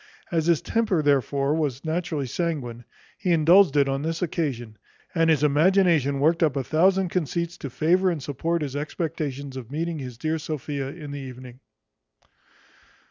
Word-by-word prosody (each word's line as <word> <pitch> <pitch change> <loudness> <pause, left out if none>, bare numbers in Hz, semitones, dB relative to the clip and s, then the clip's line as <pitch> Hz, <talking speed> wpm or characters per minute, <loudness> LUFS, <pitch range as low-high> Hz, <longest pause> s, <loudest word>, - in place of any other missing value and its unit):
As 165 -2 0
his 170 -4 +3
temper 215 -8 +1
therefore 140 0 +2
was 145 -3 -2
naturally 160 -3 -2
sanguine, 125 -5 -3 0.3
he 190 - -2
indulged 170 0 +5
it 140 -1 +4
on 135 0 -1
this 165 +3 -2
occasion, 125 - -3 0.3
and 165 -1 +2
his 155 -3 +3
imagination 150 -2 +3
worked 165 +4 +2
up 155 -4 +2
a 135 - -1
thousand 185 +5 +2
conceits, 170 0 -2
to 140 - -5
favour 180 +8 +2
and 165 -6 -3
support 165 +4 -2
his 140 -2 -5
expectations 145 -2 -4
of 125 -3 -7
meeting 165 +2 -3
his 125 -3 -7
dear 160 +4 -1
Sophia 145 -2 -4
in 150 -1 -8
the 145 - -5
evening. 130 -1 -10
155 Hz, 160 wpm, -25 LUFS, 140-170 Hz, 0.3 s, indulged